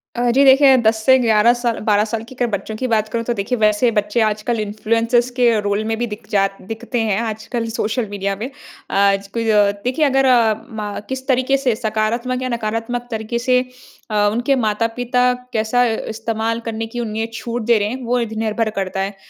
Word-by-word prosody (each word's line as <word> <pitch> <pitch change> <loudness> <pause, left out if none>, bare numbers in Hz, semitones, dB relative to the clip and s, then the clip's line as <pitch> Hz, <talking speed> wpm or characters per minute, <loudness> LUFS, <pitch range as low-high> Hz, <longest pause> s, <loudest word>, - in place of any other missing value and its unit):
अ, 240 0 +1
जी 270 +4 +4
देखिए, 270 0 +7
10 225 -2 +3
से 260 0 +7
11 230 -1 +4
साल 235 -2 -1
12 210 -1 +3
साल 225 0 -4
की 260 - -12
अगर 245 -1 0
बच्चों 200 +2 -3
की 255 - -2
बात 220 -2 +1
करूँ, 230 +1 -2
तो 240 - 0
देखिए, 210 +3 -2
वैसे 215 +2 +3
बच्चे 210 +1 0
आजकल 215 +2 0
इन्फ़लुएनसर्स 230 +3 0
के 245 - +4 0.2
रोल 205 +1 -1
में - - +1
भी 240 +1 -1
दिख 210 0 -9
जा 195 -1 +3 0.3
दिखते 240 +2 -3
हैं 200 -1 +1
आजकल 225 +1 -4
सोशल 220 +2 -1
मीडिया 200 -1 -2
में। 225 +6 -5 0.4
आज 195 0 +2
क 230 - 0
अ, 210 -2 +3
देखिए 260 +5 +1
अगर 270 -1 +2
अ, 235 -4 +4 0.2
मा 210 -3 -5
किस 260 0 -5
तरीके 260 0 +2
से 260 -4 0
सकारात्मक 230 +3 -1
या 255 - -2
नकारात्मक 235 +1 -3
तरीके 220 +1 -3
से 250 +1 +3 0.5
अ, 205 -1 +3
उनके 245 +5 +1
माता-पिता 230 +3 0 0.3
कैसा 225 +2 +2 0.3
इस्तेमाल 225 0 -2
करने 225 0 -3
की 240 +2 -6
उन्हें 225 -1 -2
छूट 235 +1 -4
दे 230 - +6
रहे 205 - 0
हैं 255 +3 -5
वो 245 +1 +1
इध 230 -2 -3
निर्भर 220 0 0
करता 195 0 -2
है। 195 +1 -2
225 Hz, 200 wpm, -19 LUFS, 215-245 Hz, 0.5 s, देखिए